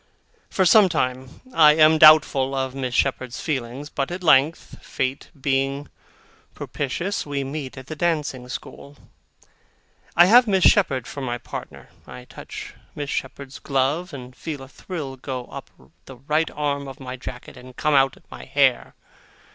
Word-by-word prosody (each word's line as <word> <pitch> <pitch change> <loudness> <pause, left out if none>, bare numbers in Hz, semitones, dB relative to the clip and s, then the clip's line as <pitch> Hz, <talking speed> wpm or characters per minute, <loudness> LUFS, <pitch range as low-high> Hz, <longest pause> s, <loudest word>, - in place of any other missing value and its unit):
For 190 - +1
some 200 +1 +6
time, 130 -4 -3
I 150 -2 +7
am 155 0 +5
doubtful 140 -3 +6
of 130 -1 -2
Miss 130 -2 -4
Shepherd's 130 -2 -1
feelings, 130 -1 -4
but, 140 - -2
at 180 +1 -6
length, 155 0 +2
Fate 130 +1 -3
being 135 +1 -1 0.7
propitious, 145 +9 -3
we 140 -1 -3
meet 135 -1 -6
at 130 - -9
the 155 - -7
dancing 150 -6 -2
school. 140 +2 -9 1.2
I 175 - +8
have 240 +5 +6
Miss 190 -3 +2
Shepherd 135 - +3
for 140 - -7
my 120 -2 -3
partner. 120 - -9 0.2
I 125 - -11
touch - - -10 0.2
Miss 145 -1 -5
Shepherd's 135 0 -5
glove, 140 +6 -1
and 125 -2 -10
feel 145 0 -6
a - - -11
thrill 145 -2 -7
go 130 -1 -6
up - - -9 0.4
the 135 - -12
right 150 +5 0
arm 140 -1 -3
of 135 +1 -10
my 130 -1 -7
jacket, 125 -1 -9
and 125 0 -13
come 150 - +1
out 135 -1 +3
at - - -22
my - - -10
hair. 135 -3 +1
140 Hz, 160 wpm, -23 LUFS, 130-155 Hz, 1.2 s, I